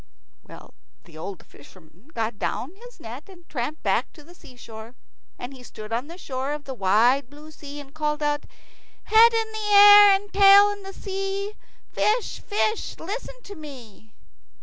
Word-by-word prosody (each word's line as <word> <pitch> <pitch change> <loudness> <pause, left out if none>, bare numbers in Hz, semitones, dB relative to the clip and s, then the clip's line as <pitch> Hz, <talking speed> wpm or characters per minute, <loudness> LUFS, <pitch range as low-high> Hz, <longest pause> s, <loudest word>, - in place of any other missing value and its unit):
Well, - - -15 0.3
the 170 - -19
poor 155 - -10
old 195 +1 -8
fisherman 175 - -19
got 225 -2 -3
down 270 +8 -3
his 485 +3 -15
net, 245 - -10
and 350 -3 -16
tramped 290 +3 -5
back - - 0
to 300 - -16
the 340 +4 -17
seashore. 235 -6 -13 0.4
And 245 +3 -8
he 260 - -13
stood 215 -2 -10
on 245 +5 -2
the 340 +2 -11
shore 270 -4 -4
of 295 -1 -7
the 270 - -7
wide 240 +5 +2
blue 300 +2 -14
sea, 290 -1 -10
and 285 -2 -11
he - - -28
called 300 -1 -2
out, 295 0 -1 0.6
"Head 450 +2 +6
in 450 -1 -2 0.2
air 410 0 +9
and 405 +1 -6
tail 400 +1 +7
in 400 -1 -8
sea, 390 +1 -5 0.4
Fish, 445 +2 -1
fish, 430 +1 -2
listen 485 +7 -7
to 405 - -10
me." 245 - -13
300 Hz, 170 wpm, -24 LUFS, 245-400 Hz, 0.6 s, air